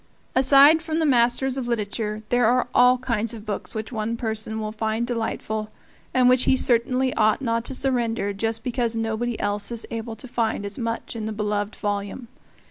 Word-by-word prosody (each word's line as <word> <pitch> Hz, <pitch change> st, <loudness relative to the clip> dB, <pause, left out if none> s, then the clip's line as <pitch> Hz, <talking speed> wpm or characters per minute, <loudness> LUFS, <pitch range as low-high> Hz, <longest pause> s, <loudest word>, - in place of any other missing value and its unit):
Aside 275 Hz, +4 st, +6 dB
from 320 Hz, -1 st, -3 dB
the 325 Hz, -, +1 dB
masters 255 Hz, 0 st, +2 dB
of 245 Hz, -, -4 dB
literature, 215 Hz, -1 st, -3 dB
there 245 Hz, -2 st, +3 dB
are 245 Hz, +1 st, +2 dB
all 250 Hz, +1 st, +6 dB
kinds 230 Hz, -2 st, -2 dB
of 215 Hz, -1 st, -10 dB
books 210 Hz, +1 st, -5 dB
which 220 Hz, +2 st, -4 dB
one 225 Hz, 0 st, -2 dB
person 220 Hz, -1 st, -3 dB
will 215 Hz, -1 st, -3 dB
find 220 Hz, +1 st, -1 dB
delightful, 225 Hz, -2 st, -3 dB, 0.4 s
and 255 Hz, -1 st, +4 dB
which 255 Hz, 0 st, +4 dB
he 260 Hz, -, +4 dB
certainly 255 Hz, +2 st, +2 dB
ought 215 Hz, -1 st, +2 dB
not 230 Hz, -3 st, -1 dB
to 265 Hz, -, -2 dB
surrender 235 Hz, -6 st, 0 dB
just 225 Hz, +2 st, -2 dB
because 240 Hz, -2 st, -1 dB
nobody 225 Hz, +1 st, -2 dB
else 205 Hz, +2 st, -2 dB
is 235 Hz, -1 st, -3 dB
able 225 Hz, 0 st, -5 dB
to 220 Hz, +4 st, -8 dB
find 225 Hz, -4 st, -1 dB
as 200 Hz, 0 st, -6 dB
much 230 Hz, 0 st, -3 dB
in 220 Hz, -1 st, -4 dB
the -, -, -3 dB
beloved 210 Hz, 0 st, -2 dB
volume. 205 Hz, +3 st, -4 dB
230 Hz, 190 wpm, -24 LUFS, 215-250 Hz, 0.4 s, Aside